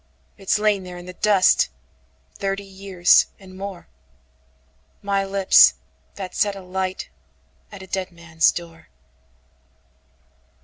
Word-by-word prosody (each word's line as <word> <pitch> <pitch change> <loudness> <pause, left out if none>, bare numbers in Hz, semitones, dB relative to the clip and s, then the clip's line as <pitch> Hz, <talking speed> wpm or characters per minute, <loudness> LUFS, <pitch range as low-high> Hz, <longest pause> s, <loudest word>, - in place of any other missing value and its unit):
It's 195 0 0
lain 210 -2 +1
there 180 -1 -9
in 175 - -10
the 180 - -9
dust, 195 - +3 0.6
Thirty 195 0 -3
years 190 -2 +2
and 190 -1 -15
more;—My 65 - -8
lips 195 -1 +5 0.4
that 190 -2 -7
set 205 -1 0
a 195 - -9
lightAt 185 0 -4 0.7
a 190 - -10
dead 190 -1 -4
man's 170 -2 +1
door. 165 -1 -10
185 Hz, 105 wpm, -22 LUFS, 170-195 Hz, 0.7 s, lips